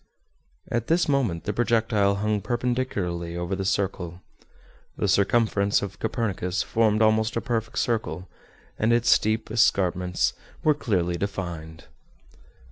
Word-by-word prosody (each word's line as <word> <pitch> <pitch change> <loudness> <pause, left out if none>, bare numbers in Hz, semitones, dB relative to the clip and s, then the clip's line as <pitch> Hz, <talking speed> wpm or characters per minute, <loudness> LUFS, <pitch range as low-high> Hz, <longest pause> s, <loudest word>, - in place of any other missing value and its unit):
At 115 -1 -1
this 170 +2 +2
moment 125 - 0
the 105 - -2
projectile 110 -3 +2
hung 105 0 0
perpendicularly 105 -8 -2
over 90 +2 -2
the 95 - -3
circle. 95 -3 -2 0.7
The - - 0
circumference 100 0 +2
of 95 -4 -6
Copernicus 100 -5 -1
formed 110 -1 +2
almost 110 +1 +2
a - - +1
perfect 115 -2 -3
circle, 110 -5 -1 0.5
and 110 +2 +2
its 120 0 +3
steep 110 0 +2
escarpments 90 -5 +2 0.3
were 155 - +5
clearly 90 - -1
defined. 85 -5 -5
105 Hz, 125 wpm, -25 LUFS, 90-115 Hz, 0.7 s, were